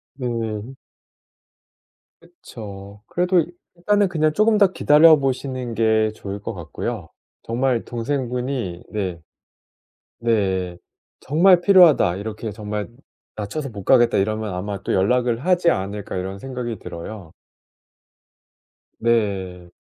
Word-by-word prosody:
네. 115 -2 -4 1.5
그쵸. 105 - -11
그래도 180 -1 +2 0.3
일단은 205 +3 +2
그냥 155 -3 +1
쪼금 215 +2 +3
더 200 -2 +6
기다려 160 -1 +6
보시는 130 -2 -2
게 110 -1 +2
좋을 100 -1 -6
것 110 +3 -5
같고요. 85 -7 -5 0.3
정말 120 0 0
동생분이 125 -5 -3
네 95 -5 -3 1.0
네. 95 -6 0 0.4
'정말 175 +5 +4
필요하다. 175 - +6
이렇게 110 +2 -5
정말 105 0 -5 0.5
낮춰서 120 +8 -4
못 100 -3 -9
가겠다.' 120 -4 +4
이러면 110 +1 -1
아마 100 +2 -4
또 - - -2
'연락을 120 - +1
하지 180 -2 +3
않을까.' 100 0 -3
이런 95 +2 -4
생각이 125 -3 -5
들어요. 85 0 -8 1.7
네. 95 -6 -1
115 Hz, 230 characters per minute, -22 LUFS, 100-140 Hz, 1.7 s, 더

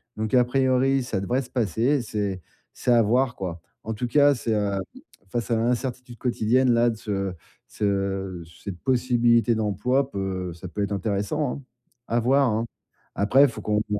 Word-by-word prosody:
donc 110 +1 -3
à 125 -1 +5
priori, 130 +1 +2
ça 110 -5 -2
devrait 120 +7 0
se 125 - -11
passer, 120 - +1
c'est 100 -5 -3 0.3
c'est 125 - -1
à 120 -1 +6
voir 125 +4 +2
quoi. 85 -3 -5 0.2
En 110 - -3
tout 125 +3 -3
cas, 145 +3 +5
c'est, 115 -3 -2
heu 100 -2 0 0.5
face 120 +3 -3
à 115 - +3
l'incertitude 125 +1 -2
quotidienne-là, 120 0 +2
de - - -6
ce 110 -1 -7
de 95 -2 -2 0.3
ce 95 -3 -2 0.2
cette 95 -4 -6
possibilité 120 -2 +2
d'emploi 125 +6 0
peut 95 -4 -3
ça 85 +2 -9
peut 100 +3 -2
être 100 - -3
intéressant 105 - -1
hein. 140 - -9 0.5
À 115 - +1
voir 135 +3 +3
hein. 110 +2 0 0.5
Après, 130 +8 +5
faut - - -8
qu'on 105 0 +1
voit. 105 -1 -1
115 Hz, 175 wpm, -25 LUFS, 100-125 Hz, 0.5 s, à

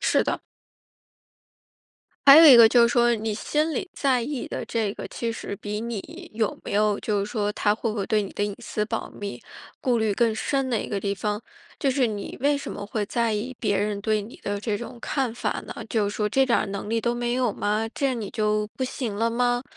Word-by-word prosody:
是 - - +3
的。 - - -2 1.9
还 275 - +12
有 330 - +9
一 255 - +10
个 230 -1 +9
就 240 +1 +5
是 235 - +5
说， 240 0 +3
你 220 0 -2
心 305 +9 0
里 375 - -3
在 260 -3 +2
意 265 +2 -4
的 - - -4
这 220 -3 -1
个， - - -6
其 235 - -3
实 225 - -5
比 205 +1 -5
你 230 -3 -6
有 220 -2 -1
没 - - -5
有 210 0 +2
就 205 -2 -1
是 200 - -2
说 210 -3 -1
他 205 0 +2
会 225 +2 -2
不 215 - -3
会 200 - -1
对 215 +2 +1
你 200 - -5
的 205 - -2
隐 205 - -1
私 215 -2 -3
保 - - -4
密， 200 -1 -7 0.4
顾 250 -2 +1
虑 220 -2 +1
更 225 +1 +2
深 270 +3 -1
的 235 -3 0
一 - - -7
个 200 - -2
地 200 0 -1
方， 210 +2 -2 0.4
就 280 - 0
是 260 -2 +2
你 205 -2 -5
为 285 +2 +2
什 - - -6
么 200 - -6
会 210 0 -3
在 235 0 0
意 230 +4 -3
别 205 -3 +1
人 205 0 -1
对 215 0 +1
你 215 +4 -11
的 205 0 -2
这 210 0 -2
种 240 +3 -8
看 265 -3 -1
法 240 - -3
呢？ - - -4 0.2
就 210 -3 0
是 - - -7
说 210 -1 0
这 270 +5 +3
点 245 -3 +2
儿 - - -1
能 200 +1 -5
力 230 0 +1
都 235 +1 0
没 240 0 -1
有 250 -4 +1
吗？ 215 +3 -1
这 275 -2 0
你 225 -5 -4
就 210 0 0
不 - - -3
行 250 -4 -3
了 225 +3 +1
吗？ 245 +1 +1
225 Hz, 260 characters per minute, -25 LUFS, 210-245 Hz, 1.9 s, 还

